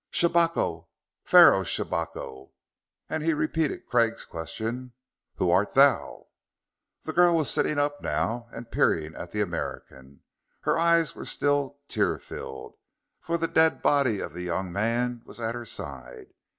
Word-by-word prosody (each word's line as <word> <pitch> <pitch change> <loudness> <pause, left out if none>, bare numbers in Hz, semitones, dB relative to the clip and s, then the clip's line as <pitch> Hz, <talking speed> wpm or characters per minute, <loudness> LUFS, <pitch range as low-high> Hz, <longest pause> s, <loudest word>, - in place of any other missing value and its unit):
"Shabako 170 -1 +1 0.4
Pharaoh - - +7
Shabako!" 65 +1 -4 0.5
And 160 - -3
he 160 0 +1
repeated 155 0 -1
Craig's 115 -2 +1
question: 110 +10 -5 0.4
"Who - - +1
art - - +2
thou?" - - +3 0.7
The - - -5
girl 175 0 +5
was 155 -4 +1
sitting 150 - 0
up 145 0 0
now, 110 +11 -2
and 115 0 -10
peering 80 -1 +1
at 85 - -8
the 105 - -2
American. 70 -7 -6 0.4
Her - - +1
eyes 170 -1 +3
were - - -9
still 145 -1 0
tear - - +1
filled, 65 - -9 0.4
for 170 +1 -2
the 165 0 -1
dead 160 0 +2
body 135 -8 +2
of - - -5
the 90 - -6
young 90 +1 -3
man 120 +3 -1
was - - -12
at 115 0 -2
her 120 0 -6
side. 65 - -9
120 Hz, 145 wpm, -26 LUFS, -, 0.7 s, Pharaoh